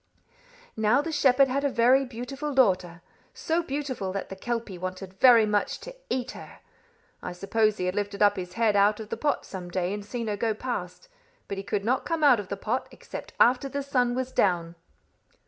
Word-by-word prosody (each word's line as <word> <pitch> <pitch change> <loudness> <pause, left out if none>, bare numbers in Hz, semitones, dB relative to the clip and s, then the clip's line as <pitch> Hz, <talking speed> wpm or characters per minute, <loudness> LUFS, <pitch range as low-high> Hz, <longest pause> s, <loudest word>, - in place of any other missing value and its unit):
"Now, 220 +6 +3
the 330 - -4
shepherd 275 -2 +4
had 275 +2 -1
a 285 - +2
very 255 +2 +4
beautiful 265 +4 -5
daughter 180 -8 +2 0.3
so 330 +2 0
beautiful 275 - -3
that 195 - -4
the 190 - -6
kelpie 230 -3 -4
wanted 185 +1 -6
very 235 -4 +7
much 210 -1 0
to - - -9
eat 255 - -2
her. - - -11 0.6
I 180 - -5
suppose 215 +4 +1
he 180 - -2
had 180 - 0
lifted 205 0 -1
up 205 0 +5
his 180 -1 -6
head 225 -1 +2
out 205 +1 +4
of 220 -1 -8
the - - -2
pot 295 -1 -1
some 180 -2 -7
day 180 +1 -1
and 205 0 -5
seen 235 +3 -5
her 210 -2 -2
go 220 +1 0
past, 255 - -5 0.4
but 200 - -4
he - - -5
could 200 0 -2
not 255 +3 +1
come 330 -2 -2
out 265 -6 +6
of 205 - -6
the 200 - -4
pot 230 +6 -2
except - - -9
after 255 +3 +4
the 280 +1 -3
sun 250 -3 +1
was 260 0 -2
down." 175 -7 +1
225 Hz, 205 wpm, -27 LUFS, 195-260 Hz, 0.6 s, very